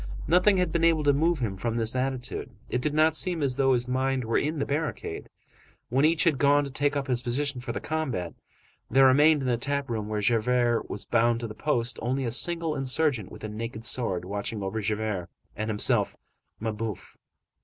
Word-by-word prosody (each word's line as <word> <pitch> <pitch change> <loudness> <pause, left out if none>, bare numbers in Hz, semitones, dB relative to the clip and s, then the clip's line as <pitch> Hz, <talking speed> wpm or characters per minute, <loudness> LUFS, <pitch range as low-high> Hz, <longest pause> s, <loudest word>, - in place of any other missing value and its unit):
Nothing 185 +4 +4
had 180 -1 +1
been 170 -1 0
able 165 -2 +3
to 145 -1 +4
move 165 +4 +2
him 110 -7 -3
from 115 +4 -2
this 115 +1 +1
attitude; 130 -1 -3 0.2
it 125 - -1
did 150 +2 -1
not 155 0 +4
seem 170 -2 +2
as 130 -3 +1
though 135 -1 +3
his 125 0 0
mind 130 0 0
were 115 - +1
in 155 +2 -2
the 140 - -1
barricade. 150 +2 -4 0.6
When 135 +4 +3
each 165 +3 +3
had 155 -7 +2
gone 145 +1 +4
to 140 - -6
take 145 +2 0
up 140 -1 -1
his 125 -3 -1
position 130 +2 -2
for 120 -1 -4
the - - -4
combat, 135 - -3 0.6
there 135 +3 +5
remained 145 +2 +5
in - - -2
the 120 -2 +1
tap 140 +1 -2
room 110 -2 -3
where 105 0 -2
Javert 120 +2 +1
was 100 - -5
bound 115 0 +2
to 115 - -3
the 110 - -8
post, 120 -1 -1
only 130 +3 -1
a 115 - -2
single 165 +4 0
insurgent 135 -5 +1
with - - -11
a - - -3
naked 110 +1 -6
sword, 100 -6 0
watching 100 +2 -4
over 110 +3 -3
Javert, 105 -4 -2 0.3
and 110 +1 -3
himself, 105 -1 +1 0.4
Mabeuf. 110 -2 -5
125 Hz, 210 wpm, -27 LUFS, 115-145 Hz, 0.6 s, there